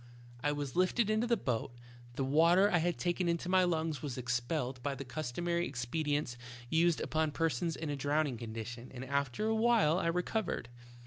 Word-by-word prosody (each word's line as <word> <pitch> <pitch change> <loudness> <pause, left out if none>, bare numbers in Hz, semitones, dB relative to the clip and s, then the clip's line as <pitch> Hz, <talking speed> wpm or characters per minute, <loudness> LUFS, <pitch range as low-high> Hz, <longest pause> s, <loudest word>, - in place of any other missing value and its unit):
"I 145 - +2
was 145 -3 -4
lifted 200 +4 +2
into 220 +2 +1
the 235 -1 +3
boat, 120 - -2 0.4
the 135 - -1
water 170 +8 +5
I 175 - +4
had 175 +1 0
taken 175 0 0
into 170 +1 -1
my 185 0 +5
lungs 160 -5 0
was 140 -4 -4
expelled 125 +2 -2
by 140 +1 -2
the 135 +1 -7
custom 130 +5 -4
ary 170 0 +1
expedients 135 0 -2 0.3
used 165 0 +3
upon 155 0 0
persons 165 +1 0
in 155 -2 -4
a - - -1
drowning 145 -1 0
condition, 115 +1 -6
and 130 +1 -6
after 140 - -1
a 220 - +2
while 220 -7 +3
I 170 - 0
recovered. 180 - -1
155 Hz, 185 wpm, -33 LUFS, 130-175 Hz, 0.4 s, water